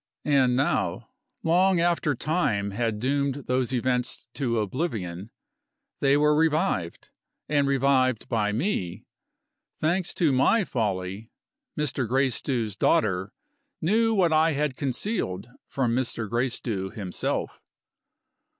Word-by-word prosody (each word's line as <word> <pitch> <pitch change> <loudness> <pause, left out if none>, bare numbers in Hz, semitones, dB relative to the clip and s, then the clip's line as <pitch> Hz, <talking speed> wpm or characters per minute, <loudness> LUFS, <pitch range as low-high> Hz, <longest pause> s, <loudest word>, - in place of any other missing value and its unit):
And 135 -4 +3
now, 135 +3 0 0.3
long 180 +2 +3
after 170 -4 +1
time 115 - 0
had 110 0 -1
doomed 140 +2 -1
those 125 0 0
events 125 0 -1
to 120 -5 -1
oblivion, 105 - -3 0.7
they 140 0 +4
were 150 0 +4
revived 150 - 0 0.4
and 145 -2 +2
revived 130 -3 +2
by 105 -3 0
me. 110 - -2 0.7
Thanks 175 +3 0
to 165 -5 +3
my 165 - +3
folly, 100 - -3 0.5
Mr. 135 -4 -1
Gracedieu's 125 -3 0
daughter 95 -2 +1 0.5
knew 225 +6 +2
what 175 -5 +3
I 160 +1 +4
had 145 -2 -1
concealed 125 - -3 0.2
from 125 -4 0
Mr. 120 -3 -1
Gracedieu 115 -4 -2
himself. 95 -3 -4
130 Hz, 110 wpm, -26 LUFS, 110-150 Hz, 0.7 s, they